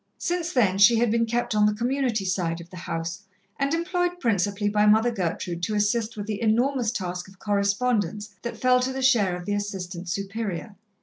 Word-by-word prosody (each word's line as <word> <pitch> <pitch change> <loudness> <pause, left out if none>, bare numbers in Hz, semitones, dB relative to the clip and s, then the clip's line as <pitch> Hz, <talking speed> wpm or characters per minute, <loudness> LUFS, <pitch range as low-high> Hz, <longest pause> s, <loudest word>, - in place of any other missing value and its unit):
Since 345 -1 -2
then, 195 -7 +2
she 225 +3 +7
had 235 -1 +2
been 230 0 +2
kept 240 0 -1
on 210 0 +4
the 210 - +1
Community 240 -2 0
side 175 -3 -1
of 170 0 -12
the - - -10
house, 165 +3 -3 0.4
and 275 0 +1
employed 355 +1 -1
principally 205 - 0
by 210 0 +3
Mother 220 +3 +5
Gertrude 175 -3 -3
to 210 +4 -1
assist 215 +2 0
with 205 - -4
the 210 0 -4
enormous 235 +1 +2
task 180 -5 -4
of 195 0 -17
correspondence 205 0 0
that 235 - -5
fell 255 0 +4
to 255 +1 -1
the 265 0 -3
share 215 -9 +3
of 175 0 -7
the 205 - -1
Assistant 190 -3 -4
Superior. 200 +1 -4
210 Hz, 195 wpm, -25 LUFS, 195-240 Hz, 0.4 s, she